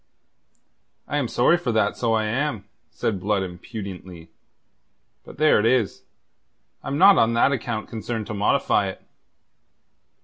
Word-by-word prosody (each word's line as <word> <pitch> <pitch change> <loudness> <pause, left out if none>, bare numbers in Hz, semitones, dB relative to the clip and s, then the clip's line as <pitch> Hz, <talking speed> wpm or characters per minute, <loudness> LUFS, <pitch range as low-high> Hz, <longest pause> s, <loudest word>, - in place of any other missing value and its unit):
"I 145 - -2
am 140 -4 0
sorry 140 +9 +3
for 155 -8 -2
that, 105 -2 +1
so 115 -2 0
I 110 -1 +1
am," 115 -2 -2 0.2
said 100 -4 -3
Blood 100 +1 0
impudently. 90 -2 -9 0.9
"But - - -13
there 155 -4 +4
it 105 - 0
is. 120 -4 +1 0.8
I'm 140 - -3
not 195 +3 +7
on 115 +1 +3
that 120 - +3
account 115 -4 -3
concerned 110 0 -5
to 110 - -6
modify 100 0 +1
it." - - -8
110 Hz, 140 wpm, -23 LUFS, 100-130 Hz, 0.9 s, not